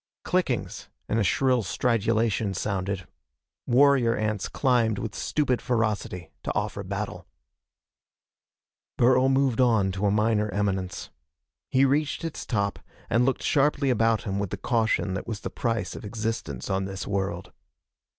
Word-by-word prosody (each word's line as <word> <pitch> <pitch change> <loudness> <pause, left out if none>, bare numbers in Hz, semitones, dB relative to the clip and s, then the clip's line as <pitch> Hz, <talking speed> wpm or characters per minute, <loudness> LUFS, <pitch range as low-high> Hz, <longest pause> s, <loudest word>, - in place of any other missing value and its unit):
Clickings - - -1 0.2
and 110 - 0
a - - +3
shrill 125 +4 +2
stridulation 110 -2 0
sounded. 95 -2 -2 0.6
Warrior 130 -2 +4
ants 105 -2 -2
climbed 120 -5 +2
with 110 0 -4
stupid 130 -5 0
ferocity 105 -8 -1
to - - -3
offer - - -2
battle. - - -5 1.7
Burl 130 +2 +4
moved 135 -2 +2
on 110 -6 +3
to 100 +2 -1
a - - +3
minor 105 +1 +2
eminence. 95 -2 -2 0.6
He 130 +1 +4
reached 145 +4 0
its 165 -2 -5
top 100 -4 -1 0.3
and 120 +2 +4
looked 135 - 0
sharply 140 -1 +2
about 115 -1 +2
him 100 -2 -2
with 100 -2 -2
the - - -4
caution 110 -5 0
that 95 - -4
was 110 -3 -4
the - - -5
price 115 -5 -2
of - - -8
existence 105 - -4
on 95 -1 0
this 95 0 -5
world. 95 -2 -3
110 Hz, 140 wpm, -26 LUFS, 100-125 Hz, 1.7 s, Warrior